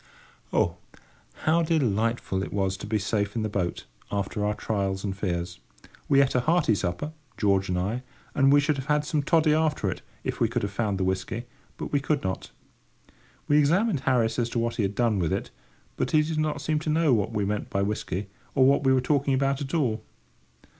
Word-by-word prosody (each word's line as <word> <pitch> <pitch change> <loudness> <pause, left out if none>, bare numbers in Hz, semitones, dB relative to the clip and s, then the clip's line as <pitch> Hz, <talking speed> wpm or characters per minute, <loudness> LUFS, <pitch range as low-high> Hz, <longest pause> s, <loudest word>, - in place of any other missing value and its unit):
Oh, - - +1 0.7
how 165 +2 +4
delightful 115 - 0
it - - -5
was 95 -1 0
to - - -7
be 110 - +1
safe 105 0 -1
in 115 - 0
the 110 - -1
boat, 95 -4 -2 0.3
after 100 +1 -2
our 105 0 0
trials 100 -3 -2
and 100 -2 -2
fears! 90 -3 -3 0.5
We 140 0 +6
ate 130 - -1
a 125 - +3
hearty 155 -2 +3
supper, 95 - -2 0.3
George 100 -2 +2
and 90 - 0
I, 105 +7 -1 0.3
and 135 0 +4
we 145 - +7
should 145 0 +1
have 135 0 -5
had 150 -1 +2
some 150 0 0
toddy 155 +1 +3
after 150 -11 +1
it, - - -7 0.2
if - - -3
we - - +3
could - - -2
have 100 - -2
found 100 -2 -1
the 95 - 0
whisky, 95 +5 -2 0.3
but - - -5
we 145 - +2
could 145 +1 0
not. 95 0 -3 1.0
We 145 +1 +5
examined 175 - +3
Harris 125 -3 +1
as 120 -1 0
to 120 - -3
what 115 0 -1
he - - +1
had 100 0 -1
done 115 -4 +2
with 85 -3 0
it; - - -2 0.5
but - - 0
he 155 -1 +4
did 155 0 -2
not 150 -2 -1
seem 155 +2 0
to 155 - -4
know 155 -2 +3
what 110 -1 +1
we 105 -3 0
meant 105 +1 -2
by 100 - 0
"whisky," 100 -1 -2 0.3
or 130 -2 +5
what 140 +1 +4
we 135 -1 +4
were 130 - +3
talking 140 0 +1
about 135 +1 +1
at 140 +4 -3
all. 115 -9 0
120 Hz, 215 wpm, -26 LUFS, 100-145 Hz, 1.0 s, we